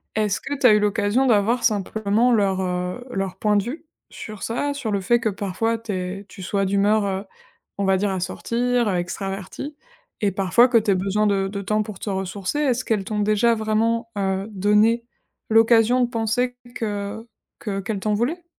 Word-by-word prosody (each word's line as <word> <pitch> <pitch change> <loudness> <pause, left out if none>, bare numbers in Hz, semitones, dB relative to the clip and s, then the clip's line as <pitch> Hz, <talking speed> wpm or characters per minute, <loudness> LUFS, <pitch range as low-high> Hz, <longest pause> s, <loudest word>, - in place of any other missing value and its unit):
Est-ce 210 -1 +1
que 285 +1 -4
tu 270 - -1
as 245 - +9
eu 210 - +4
l'occasion 210 +4 +1
d'avoir 230 +1 +2
simplement 215 +2 +1
leur, 195 -4 +2
heu, 180 +5 -3
leur 195 -4 -3
point 210 -1 +1
de 200 - +2
vue 275 - -6 0.2
sur 215 -3 -9
ça? 285 +5 -1
Sur 275 -6 -4
le 200 -1 0
fait 240 +6 +3
que 230 - -1
parfois 210 +3 -1
tu 225 -1 -7
es 185 +1 -4
tu 190 - -11
sois 195 +2 -1
d'humeur, 200 +2 +2
heu, 195 0 -2 0.5
on 200 - -1
va 190 -1 +3
dire 205 +2 0
à 190 -2 -2
sortir, 240 +5 0
heu, 195 - +1
extravertie 195 - -5 0.5
et 205 -2 +2
parfois 195 +6 +4
que 240 - +4
tu 215 -2 +2
aies - - +3
besoin 200 +3 +1
de 195 -1 +1
de 200 0 -4
temps 215 +2 0
pour 210 -3 -9
te - - -5
ressourcer. 190 +5 -3
Est-ce 255 -4 +1
qu'elles 215 -4 0
t'ont 210 +2 -3
déjà 215 +3 +3
vraiment, 225 +1 0
heu, 195 0 -1
donné 210 +4 +3 0.5
l'occasion 225 +2 +5
de 245 - +3
penser 240 +2 -1 0.2
que 210 0 -4 0.3
que 195 -3 -3
qu'elles 200 +1 -3
t'en 210 +2 0
voulaient? 290 - -1
210 Hz, 195 wpm, -22 LUFS, 195-230 Hz, 0.5 s, as